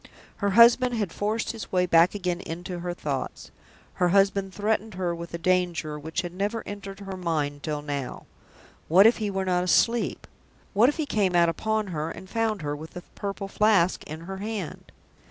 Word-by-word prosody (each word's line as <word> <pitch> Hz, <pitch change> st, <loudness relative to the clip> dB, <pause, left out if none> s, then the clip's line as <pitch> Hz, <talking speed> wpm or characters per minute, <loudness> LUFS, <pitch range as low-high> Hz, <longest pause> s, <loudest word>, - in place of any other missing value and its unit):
Her 200 Hz, -, 0 dB
husband 245 Hz, +1 st, +7 dB
had 205 Hz, -7 st, -2 dB
forced 215 Hz, +2 st, -1 dB
his 225 Hz, -2 st, -8 dB
way 180 Hz, -1 st, +3 dB
back 170 Hz, +2 st, +4 dB
again 180 Hz, -3 st, -2 dB
into 175 Hz, +1 st, -6 dB
her 175 Hz, 0 st, -4 dB
thoughts; 140 Hz, -6 st, -4 dB, 0.5 s
her 180 Hz, -, +4 dB
husband 195 Hz, 0 st, +2 dB
threatened 215 Hz, +1 st, -1 dB
her 180 Hz, -2 st, -1 dB
with 170 Hz, 0 st, -7 dB
a -, -, -2 dB
danger 170 Hz, -4 st, 0 dB
which 160 Hz, +3 st, -3 dB
had 175 Hz, -1 st, -6 dB
never 205 Hz, +5 st, -2 dB
entered 200 Hz, -1 st, -8 dB
her 195 Hz, -1 st, -6 dB
mind 150 Hz, -5 st, -2 dB
till 150 Hz, -1 st, -3 dB
now. 140 Hz, -3 st, -5 dB, 0.6 s
What 185 Hz, +5 st, +6 dB
if 230 Hz, -, +6 dB
he 215 Hz, -2 st, -2 dB
were 195 Hz, -1 st, -2 dB
not 180 Hz, -1 st, +1 dB
asleep? 230 Hz, +6 st, +2 dB, 0.5 s
What 225 Hz, +5 st, +5 dB
if 295 Hz, -, -3 dB
he 315 Hz, -, -1 dB
came 200 Hz, -9 st, +1 dB
out 170 Hz, -1 st, +5 dB
upon 220 Hz, +6 st, -1 dB
her, 155 Hz, +1 st, -2 dB
and 190 Hz, -, -9 dB
found 220 Hz, -3 st, -1 dB
her 145 Hz, 0 st, -2 dB
with 155 Hz, +2 st, -10 dB
the 180 Hz, -, -7 dB
Purple 200 Hz, 0 st, -4 dB
Flask 195 Hz, -3 st, +2 dB
in 155 Hz, +2 st, -7 dB
her 190 Hz, +3 st, -6 dB
hand? 205 Hz, -4 st, -5 dB
185 Hz, 190 wpm, -26 LUFS, 170-210 Hz, 0.6 s, husband